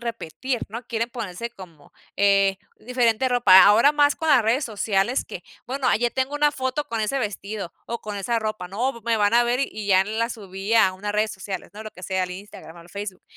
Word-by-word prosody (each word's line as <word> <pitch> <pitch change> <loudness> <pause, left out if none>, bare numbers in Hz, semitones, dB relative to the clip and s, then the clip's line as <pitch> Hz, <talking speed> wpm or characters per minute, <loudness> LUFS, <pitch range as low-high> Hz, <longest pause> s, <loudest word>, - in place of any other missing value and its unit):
repetir, 230 +1 -4
¿no? 230 +4 -6
Quieren 230 0 -2
ponerse 230 -1 -5
como, 170 -9 -15 0.2
eh, 195 -1 +3 0.2
diferente 245 +1 +1
ropa. 235 -7 +7
Ahora 230 +8 +6
más 290 -1 +3
con 320 - -3
las 275 -6 +6
redes 240 +6 +1
sociales 215 +1 0
que, - - -8 0.2
bueno, 265 +1 0
ya 240 +2 0
tengo 265 +3 -2
una 295 0 +3
foto 260 +1 -2
con 230 -1 -2
ese 220 +6 -1
vestido, 205 -4 -5
o 235 0 -4
con 210 -1 -6
esa 230 +4 -1
ropa. 215 -4 -4
"No, 210 +8 -1
m 235 - -11
v - - -32
me 230 -1 +1
van 205 +2 +2
a 240 0 +5
ver 240 +2 0
y 215 -6 -4
ya 190 -2 +5
en 215 +3 -2
la 230 +1 0
subí 195 -1 -4
a 205 -4 +5
unas 205 +2 -4
redes 215 +1 +1
sociales, 190 -1 -7
¿no? 215 - -8
Lo 215 - -8
que 185 - -15
sea, 190 0 -1
al 180 - -3
Instagram 180 -3 -10
o - - -12
al 170 - -16
Facebook". 200 0 -7
215 Hz, 235 wpm, -23 LUFS, 195-240 Hz, 0.2 s, ropa